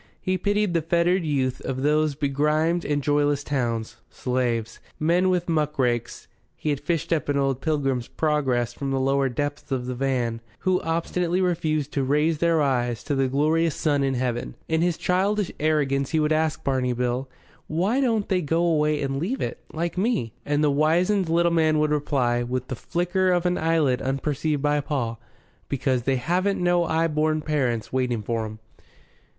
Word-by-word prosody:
He 185 - -1
pitied 205 0 0
the 165 - +2
fettered 170 +3 +2
youth 135 -5 -1
of 130 0 -3
these 150 0 +2
begrimed 150 +4 +1
and 145 -1 -1
joyless 145 0 +1
towns 115 -5 -2
slaves, 120 -3 -2 0.2
Men 175 +4 +2
with 180 -1 0
Muckrakes 135 -7 -1 0.3
(he 150 - -2
had 145 - -1
fished 170 +1 -1
up 155 -3 -1
an 145 - +1
old 135 -2 0
"Pilgrim's 135 -6 0
Progress" 130 -6 0
from 140 +1 -4
the 135 0 0
lower 135 0 +2
depths 145 +4 -4
of 130 -2 -1
the 125 - -3
van), 125 -3 -1 0.2
who 185 -1 +1
obstinately 170 +2 -1
refused 160 -5 0
to 140 - 0
raise 150 +3 +1
their 165 -2 +3
eyes 120 -4 0
to 145 - -2
the 135 -1 +2
glorious 155 +4 +1
sun 145 -3 +1
in 135 -1 0
heaven. 120 -1 -2
In 160 0 +1
his 175 -1 +1
childish 195 +2 0
arrogance 140 -3 +1
he 160 - +1
would 150 0 +1
ask 155 0 0
Barney 130 -2 0
Bill, 125 +2 -2 0.4
"Why 195 - +1
don't 225 -6 +1
they 185 -2 +1
go 165 +2 0
away 150 -3 +2
and 135 0 -2
leave 215 - -2
it, - - -3
like 170 +2 -3
me?" 190 - 0
And 145 +1 +1
the 150 - +3
wizened 170 +6 +2
little 170 +1 +3
man 155 -2 +3
would 150 0 +2
reply, 135 -5 +1
with 125 +1 -3
the 130 - -2
flicker 180 - 0
of 175 0 +1
an 180 0 +1
eyelid 160 -6 +2
unperceived 145 +2 -1
by 145 0 +2
Paul, 120 -6 -3 0.5
"Because 130 -2 0
they 135 +2 +1
haven't 180 +10 0
no 175 -1 +2
'igh 165 +1 +2
born 155 +1 +1
parents 125 -8 -1
waiting 125 -4 0
for 115 0 -2
'em. 110 0 -9
150 Hz, 180 wpm, -24 LUFS, 130-165 Hz, 0.5 s, their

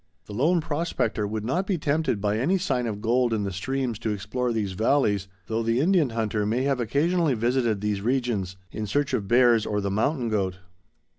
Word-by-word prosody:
The 105 - -9
lone 160 - +2
prospector 145 -9 -1
would 110 +1 -4
not 180 +10 -1
be 190 - +1
tempted 150 -6 0
by 105 +1 0
any 175 +11 +2
sign 130 -10 -1
of 105 -2 -4
gold 120 +1 +2
in 105 - -1
the 100 - -2
streams 125 +4 -2
to 115 - -2
explore 110 +5 -2
these 105 -4 -1
valleys, 105 -1 +1 0.2
though 110 +1 -1
the 115 +1 +1
Indian 165 -2 +3
hunter 110 -2 -1
may 115 +5 0
have 135 -2 +1
occasionally 150 +5 +1
visited 120 -2 +1
these 105 -2 -1
regions 115 -6 -1
in 110 -1 -4
search 145 +7 0
of 100 - -1
bears 120 -1 +5
or 105 -1 -1
the 100 -1 -2
mountain 120 +5 0
goat. 95 -4 -1
115 Hz, 200 wpm, -25 LUFS, 105-135 Hz, 0.2 s, bears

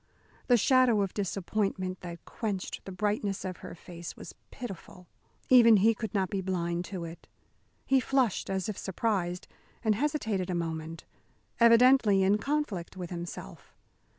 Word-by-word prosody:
The 245 - +6
shadow 250 -2 +4
of 195 - -4
disappointment 195 -1 -2
that 170 -1 -8
quenched 205 -5 -4
the 195 - -7
brightness 205 +1 -1
of 185 -1 -4
her - - -9
face 170 -1 -9
was - - -9 0.2
pitiful. 195 -6 -9 0.4
Even 230 -4 +7
he 220 +4 +4
could 220 -2 -5
not 190 -3 0
be 195 - -1
blind 175 -2 -2
to 180 -3 -5
it. 165 +1 -10 0.6
He 270 0 +4
flushed 255 -5 0
as 190 -2 -1
if 215 - -4
surprised, 185 -3 -2 0.4
and 220 -2 +3
hesitated 220 -7 -1
a 180 - -1
moment, 165 -1 -4 0.5
evidently 230 -3 +6
in 200 +2 +3
conflict 235 - -2
with 180 -1 -6
himself. 170 - -8
195 Hz, 150 wpm, -29 LUFS, 180-225 Hz, 0.6 s, Even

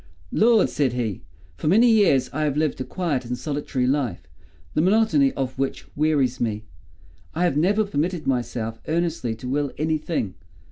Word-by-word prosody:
"Lord!" 225 -1 +4
said 135 -5 +1
he, 115 -6 -2 0.4
"for - - -4
many 220 +9 +5
years 200 - +4
I 155 +2 0
have 145 -1 -1
lived 150 -4 0
a - - 0
quiet 155 -5 -2
and 125 +1 -4
solitary 140 -1 -2
life, 130 - 0 0.5
the 155 - +2
monotony 225 - +3
of 130 -1 -4
which 135 0 -3
wearies 145 -4 +1
me. 110 -2 -1 0.7
I 170 - 0
have 175 -6 +2
never 200 +8 +2
permitted 170 -2 -2
myself 115 -3 -2
earnestly 160 -8 -1
to 120 +3 -8
will 140 +1 -1
any 155 +1 0
thing. 150 - -2
145 Hz, 170 wpm, -23 LUFS, 125-175 Hz, 0.7 s, many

